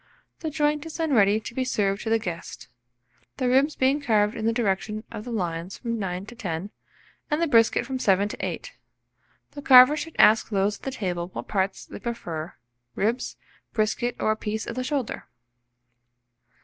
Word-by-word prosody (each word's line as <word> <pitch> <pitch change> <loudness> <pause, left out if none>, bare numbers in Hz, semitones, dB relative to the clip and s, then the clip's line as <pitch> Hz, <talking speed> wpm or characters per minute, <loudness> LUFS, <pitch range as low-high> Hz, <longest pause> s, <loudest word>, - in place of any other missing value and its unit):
The 320 - -3
joint 295 -1 0
is 320 - -7
then 320 -3 0
ready 205 -2 +4
to 220 - -8
be 260 - -1
served 200 -5 0
to 225 - -3
the 225 - +4
guests; 175 -7 -6 0.7
the 255 - 0
ribs 270 +4 +3
being 270 +3 +2
carved 215 -5 +2
in 220 0 -2
the - - +3
direction 215 -1 -1
of 210 - -7
the 245 - -6
lines 175 -3 -3
from 230 -2 -3
9 185 -1 -3
to 240 - -11
10, 190 -4 -4 0.6
and 300 - +1
the 335 - +2
brisket 230 -7 +3
from 265 -1 -4
7 200 -3 +3
to - - -6
8. - - -4 0.8
The 285 - -8
carver 255 +1 +8
should 315 +2 -6
ask 220 +1 +5
those 200 0 +1
at - - -33
the - - -1
table 180 -8 -3
what - - -6
parts 190 -1 -1
they - - -9
prefer 170 -9 -5 0.4
ribs, 230 +5 -1 0.4
brisket, 235 +2 0
or 215 - +2
a - - +1
piece 215 0 -4
of - - -5
the 255 - -2
shoulder. 270 -3 -3
225 Hz, 190 wpm, -25 LUFS, 200-260 Hz, 0.8 s, carver